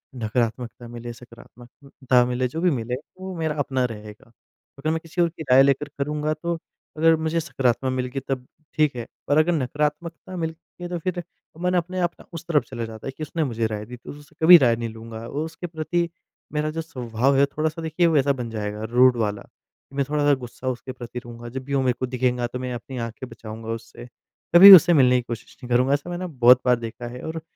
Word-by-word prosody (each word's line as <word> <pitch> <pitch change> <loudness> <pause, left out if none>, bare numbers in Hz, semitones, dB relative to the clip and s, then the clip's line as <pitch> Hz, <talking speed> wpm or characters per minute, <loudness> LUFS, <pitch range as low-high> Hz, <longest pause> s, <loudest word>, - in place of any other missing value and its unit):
नकारात्मकता 120 +1 -2
मिले, 120 0 -7
सकारात्मकता 125 +2 -3
मिले 125 +1 -1
जो 160 +7 -5
भी 180 -1 +3
मिले 125 -1 -2 0.2
वो 190 -1 -6
मेरा 160 -2 -1
अपना 130 -2 0
रहेगा। 105 -1 -9 0.5
अगर 155 +3 -1
मैं 160 - 0
किसी 165 +2 -3
और 170 - +3
की 160 -1 -9
राय 135 +1 +8
लेकर 140 +2 +1
करूँगा 150 +2 -1
तो 170 +2 -3 0.4
अगर 165 +1 +5
मुझे 160 +1 -1
सकारात्मक 130 -5 0
मिल 130 -1 -1
गई - - 0
तब 130 -2 -2 0.3
ठीक 150 -4 +2
है, 120 -1 -5 0.2
पर 145 - +3
अगर 160 +3 +4
नकारात्मकता 150 +5 -2
मिलती 165 +2 -7
है 175 - -5
तो 175 - -3
फिर 175 +1 -3 0.4
मन 180 0 +1
अपने 180 +2 -2
आप 175 -1 +1
ना - - -15
उस 165 0 -7
तरफ 155 -4 +2
चला 120 -3 -4
जाता 110 +2 -9
है - - -3
कि 155 - -5
उसने 160 +1 -2
मुझे 115 -4 -1
राय 105 -1 -5
दी, 125 +2 -9
तो 120 - -10
उससे 145 0 -14
कभी 175 +1 +11
राय 120 -5 +3
नहीं 115 0 -4
लूँगा। 110 0 -9
और 150 +5 -3
उसके 165 +2 -7
प्रति 170 +1 -2 0.4
मेरा 150 0 0
जो 165 +1 -3
स्वभाव 125 -2 -1
है 140 - +5
थोड़ा-सा 155 +3 -3
देखिए 160 +2 +1
वैसा 145 -3 +3
बन 125 -3 -5
जाएगा 105 -1 -4
रूड 125 0 +5
वाला, 105 -3 -2 0.5
मैं 140 -1 0
थोड़ा-सा 145 -1 +3
गुस्सा 130 -1 -6
उसके 130 +1 -5
प्रति 125 -1 -7
रहूँगा 120 0 -10
जब 130 +1 -6
भी 140 - -5
वो 135 - +2
मेरे 125 -1 +2
को 130 - 0
दिखेगा 125 -1 0
तो 125 +1 -6
मैं 125 -1 -4
अपनी 125 +2 -7
आँखें 115 +2 -6
बचाऊँगा 110 0 -9
उससे, 115 +1 -8 0.5
कभी 195 +3 +12
उससे 175 0 +6
मिलने 125 -4 +5
की 125 - 0
कोशिश 115 -2 -7
नहीं 125 - -8
करूँगा। 130 +3 +3
ऐसा 145 +5 -2
मैंने 180 +1 -4
बहुत 125 -4 +5
बार 125 - +5
देखा 115 +1 -7
है 125 +1 -8
और 160 0 -5
130 Hz, 220 wpm, -23 LUFS, 120-160 Hz, 0.5 s, कभी